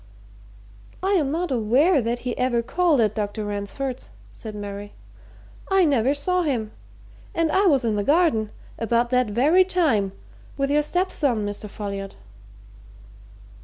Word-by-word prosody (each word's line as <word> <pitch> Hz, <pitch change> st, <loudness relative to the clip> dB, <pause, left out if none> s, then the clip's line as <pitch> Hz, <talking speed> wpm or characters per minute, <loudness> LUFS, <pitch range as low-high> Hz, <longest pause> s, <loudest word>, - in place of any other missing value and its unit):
"I 385 Hz, -, +1 dB
am 310 Hz, -9 st, +2 dB
not 335 Hz, 0 st, -2 dB
aware 260 Hz, -, +3 dB
that 235 Hz, +1 st, -1 dB
he 250 Hz, -, -2 dB
ever 245 Hz, -2 st, 0 dB
called 335 Hz, +2 st, +2 dB
at 215 Hz, -2 st, +2 dB
Dr. 210 Hz, 0 st, -3 dB
Ransford's," 205 Hz, +6 st, -4 dB, 0.2 s
said 215 Hz, -2 st, -9 dB
Mary. 205 Hz, 0 st, -7 dB, 0.8 s
"I 385 Hz, -2 st, +4 dB
never 275 Hz, -2 st, +2 dB
saw 360 Hz, +5 st, 0 dB
him 240 Hz, -10 st, -1 dB, 0.6 s
and 330 Hz, -1 st, +1 dB
I 390 Hz, +4 st, +3 dB
was 275 Hz, -7 st, +3 dB
in 225 Hz, -, +1 dB
the 205 Hz, -1 st, 0 dB
garden, 285 Hz, -, +2 dB, 0.3 s
about 235 Hz, +2 st, +1 dB
that 250 Hz, -1 st, +3 dB
very 290 Hz, -, +4 dB
time, 305 Hz, -, +1 dB, 0.5 s
with 275 Hz, 0 st, 0 dB
your 300 Hz, +1 st, +4 dB
stepson, 295 Hz, -, 0 dB
Mr. 205 Hz, +1 st, -6 dB
Folliot." 200 Hz, -1 st, -6 dB
250 Hz, 140 wpm, -23 LUFS, 215-315 Hz, 0.8 s, I